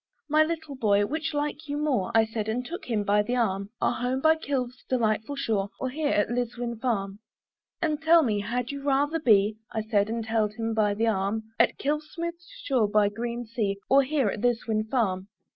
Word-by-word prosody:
"My 310 +1 +5
little 315 -2 -4
boy, 205 -5 +3
which 315 +6 -2
like 295 +1 -3
you 290 0 -2
more," 285 -11 0
I 225 0 +6
said 220 -1 -4
and 245 +3 -2
took 345 +7 -6
him 220 -4 0
by 205 +1 +3
the 240 +4 -2
arm 200 -4 0
"Our - - +2
home 250 +2 -1
by 315 +3 +5
Kilve's 255 -5 -3
delightful 225 +1 0
shore, 210 -7 -1
"Or 260 - -2
here 300 +2 -1
at 205 -2 +1
Liswyn 240 -1 -3
farm?" 200 -5 -1 0.6
"And 310 -2 0
tell 325 +1 +6
me, 215 -6 +1
had 245 +4 -2
you 280 0 -6
rather 285 +3 +1
be," 215 -6 +4
I 220 - -2
said 215 -1 +1
and 225 0 -2
held 220 -2 0
him 225 -1 -2
by 210 -2 +2
the 225 +2 +1
arm, 215 0 0 0.2
"At - - +3
Kilve's 300 +2 -2
smooth 340 0 -3 0.3
shore 250 -6 +2
by 205 0 +3
the - - -17
green 240 +1 -3
sea, 215 -3 -2
"Or 275 +1 +6
here 275 -4 +1
at 205 - -4
Liswyn 225 -2 0
farm?" 195 -7 0
235 Hz, 210 wpm, -27 LUFS, 215-280 Hz, 0.6 s, I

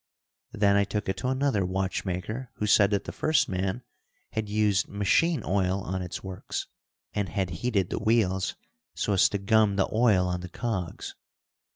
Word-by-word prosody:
Then 100 -1 +3
I 100 - +4
took 105 +1 -3
it 95 - -1
to 125 - -3
another 130 -5 +1
watchmaker 95 +5 -3
who 105 - -2
said 105 -1 +5
that 100 -2 0
the - - -6
first 155 -1 +2
man 95 +6 -2 0.5
had 110 -1 -3
used 105 -2 +2
machine 115 +8 +2
oil 95 0 +1
on 95 0 -3
its 90 -1 -6
works, 95 -1 -5 0.5
and 100 -3 -1
had 95 -2 -2
heated 100 -7 0
the - - -1
wheels 100 -4 +1 0.4
so 105 - 0
as 95 - +5
to 100 - -1
gum 105 +1 +3
the 95 - +2
oil 110 -5 +4
on 90 0 -2
the 90 - -7
cogs. 100 -5 -4
100 Hz, 175 wpm, -27 LUFS, 95-110 Hz, 0.5 s, said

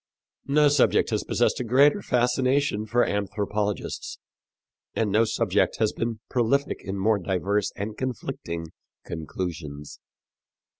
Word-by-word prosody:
No 150 +1 +5
subject 145 -2 +3
has - - 0
possessed - - +1
a - - -1
greater 140 - +4
fascination 125 - +1
for 120 +3 +3
anthropologists, 105 0 -2 0.8
and 110 -3 0
no 110 +3 +4
subject 110 -3 +1
has 110 -1 +1
been 115 -1 -3
prolific 135 +3 +1
in 95 +1 -4
more 105 +2 +2
diverse 95 +2 0
and 105 +2 -4
conflicting 95 -10 -4 0.4
conclusions. 80 -3 -6
110 Hz, 115 wpm, -25 LUFS, 100-125 Hz, 0.8 s, No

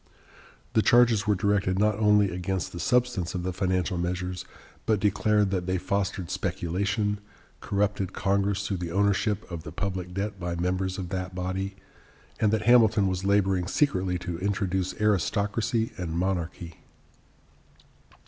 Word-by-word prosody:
The 110 - +4
charges 120 -4 +4
were 105 - +4
directed 95 -1 +1
not 105 +2 +3
only 105 -2 +4
against 90 +1 -3
the 85 - -7
substance 120 -3 +1
of 90 - -2
the 90 0 -2
financial 90 0 0
measures, 90 +1 -3 0.4
but 110 -2 +3
declared 105 0 +2
that 90 -2 -1
they 95 0 +1
fostered 95 -1 -2
speculation, 100 +4 -1 0.4
corrupted 100 -2 -1
Congress 100 +1 0
through 100 - -1
the 85 -1 -4
ownership 100 +2 +1
of 85 -2 -4
the 75 - -8
public 90 0 -3
debt 100 0 -3
by 85 -1 -3
members 90 +2 -1
of 90 -3 -5
that 90 -1 -4
body, 95 +2 -3 0.6
and 105 - +3
that 110 -1 +1
Hamilton 110 -3 +5
was 95 0 -1
laboring 95 -3 +2
secretly 95 -8 +1
to 85 -1 -5
introduce 95 -1 -1
aristocracy 105 +3 +1
and 85 -3 -3
monarchy. 85 -2 -2
95 Hz, 145 wpm, -27 LUFS, 90-105 Hz, 0.6 s, Hamilton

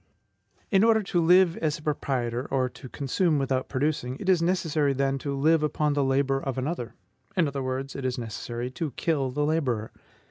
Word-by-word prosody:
In 195 0 +5
order 220 -1 +4
to 180 -2 0
live 180 +1 +5
as 155 -2 -1
a 150 - -14
proprietor, 130 -5 -1
or 130 -2 +1
to 130 +1 -12
consume 150 +5 0
without 135 -1 -1
producing, 135 -2 -1
it 190 - -3
is 180 -3 +4
necessary, 165 -5 +1
then, 135 0 0
to 140 0 -3
live 160 +3 +4
upon 150 0 +1
the 145 -1 +1
labor 135 0 +1
of 135 -2 -3
another; 130 -2 -3 0.4
in 170 -4 +4
other 140 -1 -3
words, 130 +1 -3
it 135 - -5
is 130 -1 -1
necessary 120 +1 -5
to 145 +1 -4
kill 145 -5 0
the 145 +3 -1
laborer. 130 -9 0
140 Hz, 190 wpm, -27 LUFS, 130-160 Hz, 0.4 s, In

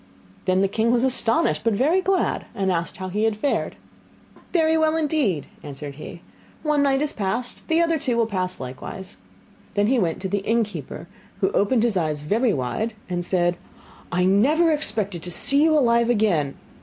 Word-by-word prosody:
Then 185 0 +2
the 195 - +3
king 220 +4 0
was 245 0 +2
astonished, 230 -11 +1
but 230 -1 +2
very 300 - +2
glad, 380 0 0
and 190 -1 0
asked 170 -1 -2
how 185 0 -5
he 210 +4 0
had 220 -2 0
fared. 280 +6 -1 0.8
'Very 320 -2 +3
well 315 0 +2
indeed,' 285 - 0 0.2
answered 145 0 -8
he; 170 +2 -9 0.4
'one 300 -2 +2
night 275 0 +2
is 300 - -2
past, 225 +5 -3
the 320 - +1
two 335 - +4
others 330 -4 0
will 235 -2 +2
pass 185 -4 -3
likewise.' 130 - -7 0.6
Then 205 0 +2
he 250 +3 +2
went 170 -5 -1
to - - -1
the 200 +2 -1
innkeeper, 220 +1 -2 0.3
who 390 - +1
opened 225 - +2
his 230 -5 +2
eyes 155 -4 -1
very 220 - +1
wide, 205 - -2
and 175 -1 -2
said: 175 -1 +1 0.5
'I 180 +1 +1
never 285 - +3
expected 210 - -1
to 180 - -6
see 280 +10 +4
you 315 0 +4
alive 235 -3 +3
again! 190 - +1
220 Hz, 180 wpm, -23 LUFS, 185-275 Hz, 0.8 s, two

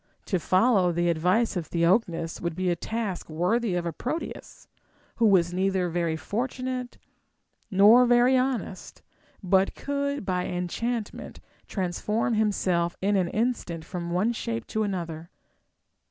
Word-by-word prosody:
To 185 - 0
follow 185 +1 +3
the 175 +1 +1
advice 180 +9 +1
of 170 -4 -3
Theognis 170 -1 +1
Avould 170 -2 -3
be 185 0 0
a - - +1
task 210 -1 -4
worthy 180 +6 0
of 175 -1 -1
a 170 - -2
Proteus, 285 - -6 0.5
who 230 - +4
was 175 -4 +3
neither 190 -1 0
very 170 -1 -1
fortunate 250 +6 -4 0.7
nor 220 +5 +6
very 245 +2 +5
honest, 255 -7 -2 0.4
but 190 +1 +2
could 280 -3 -2
by 180 -1 -1
enchantment 210 +6 -4 0.3
transform 210 +5 -1
himself 185 -5 +1
in 200 +2 +1
an 185 -3 +2
instant 210 -7 -2
from 175 -1 -5
one 190 +7 +1
shape 230 0 -4
to 220 - -1
another. 170 -5 -4
190 Hz, 135 wpm, -26 LUFS, 175-230 Hz, 0.7 s, nor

